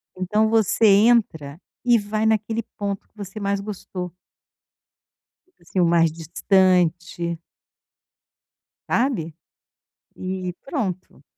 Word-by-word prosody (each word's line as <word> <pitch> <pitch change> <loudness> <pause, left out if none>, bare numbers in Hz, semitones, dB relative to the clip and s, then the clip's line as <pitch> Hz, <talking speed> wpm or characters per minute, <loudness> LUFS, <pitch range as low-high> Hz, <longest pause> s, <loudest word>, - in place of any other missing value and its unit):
Então, 210 +4 +1
você 220 0 +2
entra 200 -8 +3 0.2
e 240 -1 +5
vai 215 +1 -2
naquele 220 +1 0
ponto 200 -2 -4
que 215 - -37
você 200 +1 -7
mais 200 0 -1
gostou. 190 -3 -6 1.3
Tipo 370 - -39
assim, 170 +2 -4
o - - +4
mais 165 -1 +3
distante. 175 0 +1 1.5
Sabe? 230 - 0 0.8
E 185 -1 -4
pronto. 190 - -4
195 Hz, 100 wpm, -22 LUFS, 175-215 Hz, 1.5 s, e